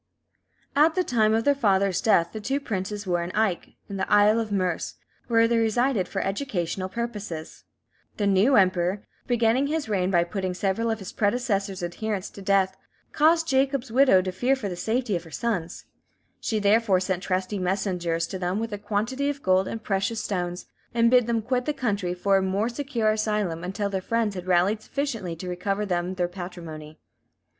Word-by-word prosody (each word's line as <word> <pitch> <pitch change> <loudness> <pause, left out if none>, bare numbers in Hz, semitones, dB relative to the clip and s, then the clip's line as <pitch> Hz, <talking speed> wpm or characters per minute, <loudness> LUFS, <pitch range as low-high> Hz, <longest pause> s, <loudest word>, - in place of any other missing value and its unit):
At 310 +3 +4
the 370 - +2
time 220 -7 +2
of 225 - +1
their 285 - +4
father's 195 -7 +2
death 170 -6 +3
the 220 - -6
two 270 +6 -1
princes 205 -4 -4
were 175 -2 0
at 170 +1 -4
Aich, 215 -5 0
in 200 - -5
the - - -3
Isle 210 +2 +5
of 220 -2 -3
Merse, 185 -4 -1 0.3
where 230 -1 +4
they 235 0 +2
resided 225 -2 +1
for - - -2
educational 195 -4 -2
purposes. 210 -8 -6 0.5
The 205 - 0
new 200 +7 +4
Emperor, 185 -1 +2 0.2
beginning 240 +2 +2
his 310 -2 -2
reign 190 -4 0
by 175 -3 +3
putting 185 0 -3
several 195 +5 0
of 220 - 0
his 195 -4 -8
predecessor's 205 -4 -1
adherents 190 +3 -3
to 200 - -11
death, 190 -1 +2 0.4
caused 325 +2 +3
Jacob's 270 -3 +1
widow 245 -7 +5
to 185 - -2
fear 245 +9 +1
for 235 -6 -4
the 180 - -4
safety 225 +3 -1
of 170 - -3
her 165 - -13
sons; 180 -4 -3 0.5
she 220 - -1
therefore 205 -1 +3
sent 185 -1 -2
trusty 185 +1 -2
messengers 180 -3 -1
to 190 - -6
them 180 +1 -1
with 225 0 -3
a 205 - -4
quantity 225 +7 -1
of 285 -1 -5
gold 185 0 +3
and 225 -1 -5
precious 195 +3 -1
stones, 180 -2 -3 0.3
and 230 0 +4
bid 250 -2 +5
them 230 -2 0
quit 250 +2 -1
the 300 - 0
country 200 -9 -1
for 195 +2 +2
a - - +2
more 195 +4 0
secure 240 -4 0
asylum 210 -6 -1
until 195 +3 -2
their 195 -1 -2
friends 230 +1 0
had 180 -1 -7
rallied 185 +4 +2
sufficiently 225 - -3
to 180 +3 -8
recover 195 +3 -2
them 180 -1 -1
their 180 -1 0
patrimony. 170 -4 -8
205 Hz, 190 wpm, -25 LUFS, 185-230 Hz, 0.5 s, Isle